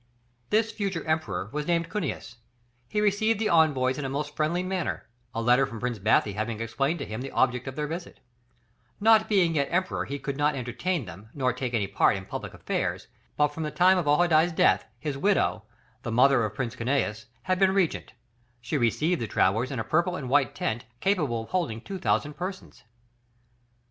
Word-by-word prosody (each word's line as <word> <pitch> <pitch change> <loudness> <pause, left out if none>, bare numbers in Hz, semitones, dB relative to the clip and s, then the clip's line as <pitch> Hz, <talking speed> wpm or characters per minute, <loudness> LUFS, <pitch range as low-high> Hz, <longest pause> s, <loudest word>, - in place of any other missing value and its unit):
This 220 +1 +2
future 195 -6 -3
Emperor 115 - -2
was 150 0 -3
named 170 -1 0
Cunius; 165 - -4 0.5
he 210 - 0
received 210 +2 +2
the 220 -1 +1
envoys 145 -5 +3
in - - -3
a 135 - -2
most 145 +2 -4
friendly 170 +4 0
manner, 185 -2 -3 0.3
a 115 0 -3
letter 125 +3 +4
from 115 - -8
Prince 120 -1 -3
Bathy 105 0 +2
having 110 +2 -3
explained 135 +8 -1
to 140 - -5
him 110 +3 -5
the 135 - -5
object 125 0 +1
of 135 - -5
their 150 - -2
visit; 170 +4 -6 0.8
not 220 0 +5
being 185 -6 +3
yet 140 -3 +1
Emperor 185 +1 -1
he 140 - -4
could 140 0 -5
not 145 0 +2
entertain 135 +5 -2
them 95 +4 -11
nor 130 -3 +1
take 125 -1 -3
any 105 -3 +1
part 100 +2 +2
in 95 0 -6
public - - -6
affairs, - - -3 0.3
but 150 0 +4
from 150 +3 -7
the 155 - -2
time 185 +3 +4
of 165 - -3
Ojadaï's 160 +2 +4
death, - - +3
his 145 -3 -4
widow, 190 - +1 0.4
the 120 - -4
mother 125 +1 +4
of 105 -1 -3
Prince 120 0 -3
Cunius 115 -4 -1 0.2
had 185 0 0
been 190 -1 +5
Regent; 190 -4 0 0.5
she 140 +5 -2
received 150 +8 +1
the 115 - -2
travellers 110 +6 +1
in 135 - -4
a 115 - -1
purple 170 +10 +1
and 130 -7 -5
white 140 -1 +2
tent 110 +1 -2
capable 150 - 0
of - - -14
holding 165 -12 -1
2000 150 -1 -1
persons. 185 +4 -7
145 Hz, 195 wpm, -27 LUFS, 120-175 Hz, 0.8 s, not